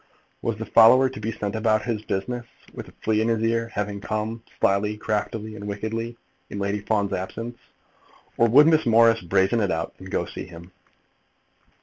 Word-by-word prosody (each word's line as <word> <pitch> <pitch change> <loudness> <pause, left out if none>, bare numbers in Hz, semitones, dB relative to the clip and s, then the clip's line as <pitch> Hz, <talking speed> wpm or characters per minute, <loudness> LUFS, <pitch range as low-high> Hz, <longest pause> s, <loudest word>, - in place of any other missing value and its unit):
Was 115 -2 -2
the 110 - -5
follower 125 +5 +6
to 130 - -9
be 110 +1 -3
sent 105 -1 -4
about 110 -1 +1
his 115 -3 -2
business, 120 +4 -4 0.3
with - - -8
a - - -14
flea 110 -1 +2
in 110 - +1
his 115 -1 0
ear, 115 0 +1
having 105 -2 -4
come, 110 +2 -3 0.2
slyly, 105 +2 +1
craftily, 110 0 -3
and 105 -1 -7
wickedly, 115 +3 -4 0.3
in - - -6
Lady 100 +1 -1
Fawn's 100 -1 -1
absence; 115 +6 -5 0.8
or 115 - +4
would 140 +6 +7
Miss 155 -4 +3
Morris 115 0 +5
brazen 95 +5 +2
it 100 - +1
out, 80 -1 -2
and 95 - -10
go - - 0
and - - -7
see - - -7
him? 85 +1 -12
110 Hz, 190 wpm, -24 LUFS, 100-115 Hz, 0.8 s, would